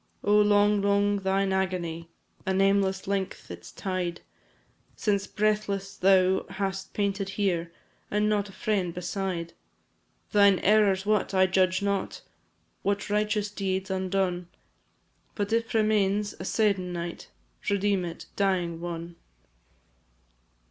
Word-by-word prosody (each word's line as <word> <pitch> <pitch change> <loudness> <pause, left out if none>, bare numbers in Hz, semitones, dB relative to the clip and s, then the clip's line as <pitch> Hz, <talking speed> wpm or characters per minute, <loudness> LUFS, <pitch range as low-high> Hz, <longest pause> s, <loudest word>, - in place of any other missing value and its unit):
Oh, 205 +1 +4
long, 205 0 +4
long 200 0 +2
thine 195 0 +1
agony! 175 -3 -2 0.4
A 190 - +1
nameless 195 0 +2
length 195 - -3
its 85 -1 -9
tide; 180 - -3 0.7
Since 200 -2 0
breathless 205 -2 -1
thou 190 0 +3
hast 195 -1 -4
panted 200 -1 -1
here, 175 -5 0 0.4
And 210 +1 +1
not 205 -1 0
a - - -10
friend 190 -4 -1
beside. 180 -1 -3 0.8
Thine 200 -2 +6
errors 200 -2 +4
what, 210 -2 +1
I 190 0 +5
judge 185 0 +2
not; 200 -1 -2 0.6
What 200 0 -1
righteous 210 0 0
deeds 190 -1 -2
undone; 185 -2 -1 0.9
But 205 +1 -2
if 230 0 0
remains 210 -2 +2
a 185 - -5
se'ennight, 180 -5 -1 0.4
Redeem 200 -1 +1
it, 170 -1 -6
dying 180 -4 0
one! 170 0 -6
195 Hz, 115 wpm, -27 LUFS, 185-205 Hz, 0.9 s, Thine